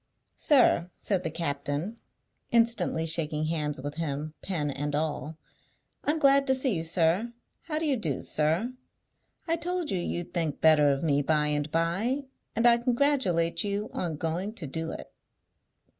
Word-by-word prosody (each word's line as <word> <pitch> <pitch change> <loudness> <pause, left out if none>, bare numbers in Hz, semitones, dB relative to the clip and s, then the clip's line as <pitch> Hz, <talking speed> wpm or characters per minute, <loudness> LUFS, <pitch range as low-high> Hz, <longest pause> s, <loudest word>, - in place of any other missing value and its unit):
"Sir," 245 - +4
said 195 -3 -1
the 165 - -3
captain, 150 +5 -3 0.5
instantly 230 -8 +2
shaking 155 -1 +3
hands 150 -3 -2
with 145 +2 -5
him, 155 -1 -3
pen 155 -7 -2
and 145 +1 -3
all, 155 0 -3 0.7
"I'm 300 +2 +1
glad 275 -2 +4
to 265 - +4
see 260 -2 +1
you, 165 -3 -2
sir. 170 +7 +1 0.3
How 305 -2 -2
do 320 - -1
you 280 -4 +1
do, 155 - -2
sir? 160 +11 0 0.7
I 330 0 +1
told 355 -1 -2
you 185 - 0
you'd 175 0 -4
think 165 -5 -1
better 155 -2 +5
of 140 +1 0
me 145 -3 +2
by 150 +1 +1
and 145 0 -1
by, 190 - 0 0.3
and 230 - +1
I 235 -1 +7
congratulate 240 - +1
you 205 +1 -3
on 170 -3 -2
going 170 +8 -3
to 185 - -5
do 160 +4 -4
it." - - -8
165 Hz, 160 wpm, -28 LUFS, 150-235 Hz, 0.7 s, I